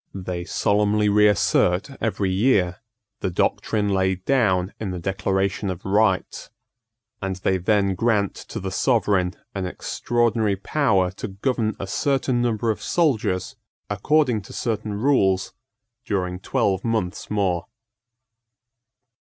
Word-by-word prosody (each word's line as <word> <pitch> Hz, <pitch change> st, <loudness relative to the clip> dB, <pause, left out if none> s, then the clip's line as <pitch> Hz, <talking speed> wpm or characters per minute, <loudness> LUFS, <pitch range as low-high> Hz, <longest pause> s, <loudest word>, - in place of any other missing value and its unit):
They 90 Hz, -2 st, -4 dB
solemnly 105 Hz, +2 st, +2 dB
reassert 105 Hz, +1 st, +3 dB
every 105 Hz, -4 st, 0 dB
year 95 Hz, -4 st, +2 dB, 0.4 s
the -, -, -1 dB
doctrine 105 Hz, +4 st, 0 dB
laid 95 Hz, -1 st, 0 dB
down 100 Hz, -8 st, +2 dB
in 105 Hz, -, -3 dB
the 90 Hz, -, -4 dB
Declaration 95 Hz, +2 st, -1 dB
of 95 Hz, 0 st, -6 dB
Rights; 95 Hz, -1 st, +1 dB, 0.7 s
and 95 Hz, -1 st, -2 dB
they 95 Hz, 0 st, 0 dB
then 100 Hz, +1 st, +2 dB
grant 105 Hz, -1 st, +1 dB
to -, -, -8 dB
the 95 Hz, 0 st, -4 dB
Sovereign 100 Hz, -5 st, +1 dB, 0.2 s
an 95 Hz, -2 st, -3 dB
extraordinary 115 Hz, +1 st, 0 dB
power 100 Hz, -4 st, +1 dB
to 95 Hz, -, -6 dB
govern 110 Hz, +2 st, -1 dB
a -, -, -4 dB
certain 130 Hz, +4 st, 0 dB
number 115 Hz, -1 st, +1 dB
of 110 Hz, -, -5 dB
soldiers 110 Hz, -, 0 dB, 0.4 s
according 125 Hz, +2 st, +2 dB
to 95 Hz, -, -12 dB
certain 110 Hz, -3 st, -2 dB
rules 100 Hz, -6 st, +2 dB, 0.5 s
during 90 Hz, -5 st, -2 dB
twelve 95 Hz, 0 st, 0 dB
months 110 Hz, -6 st, -2 dB
more. 95 Hz, -5 st, 0 dB
100 Hz, 120 wpm, -23 LUFS, 95-110 Hz, 0.7 s, reassert